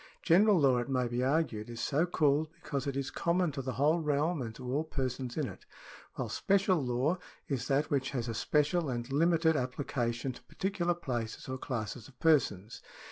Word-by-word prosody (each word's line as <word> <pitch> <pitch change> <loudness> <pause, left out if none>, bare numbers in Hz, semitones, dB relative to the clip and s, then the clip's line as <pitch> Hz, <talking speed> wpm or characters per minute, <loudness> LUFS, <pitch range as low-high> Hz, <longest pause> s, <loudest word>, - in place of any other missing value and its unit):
General 195 +3 +5
law, 135 -4 +4
it 120 - -4
may 130 -2 +1
be 120 +1 -2
argued, 130 -6 0
is 120 -1 -7
so 150 +8 +1
called 155 -2 +2
because 145 -4 -4
it 140 -1 -2
is 140 0 -2
common 170 -1 +1
to 140 -1 -4
the 130 -1 -3
whole 150 +8 +3
realm 150 +1 0
and 110 -2 -5
to 130 - -9
all 150 +3 +1
persons 130 -4 -3
in 150 -4 0
it, - - -10 0.5
while - - -3
special 190 -5 +2
law 130 +8 0 0.3
is 135 -5 -2
that 140 +2 +1
which 135 -2 +1
has 125 -3 -3
a 115 - -2
special 150 +6 +1
and 120 0 -3
limited 160 +2 +3
application 125 -2 -2
to - - -13
particular 185 -3 -1
places 120 -9 -4
or 130 0 -4
classes 115 -2 -4
of 130 -3 -20
persons. 115 - +2
140 Hz, 190 wpm, -31 LUFS, 125-160 Hz, 0.5 s, General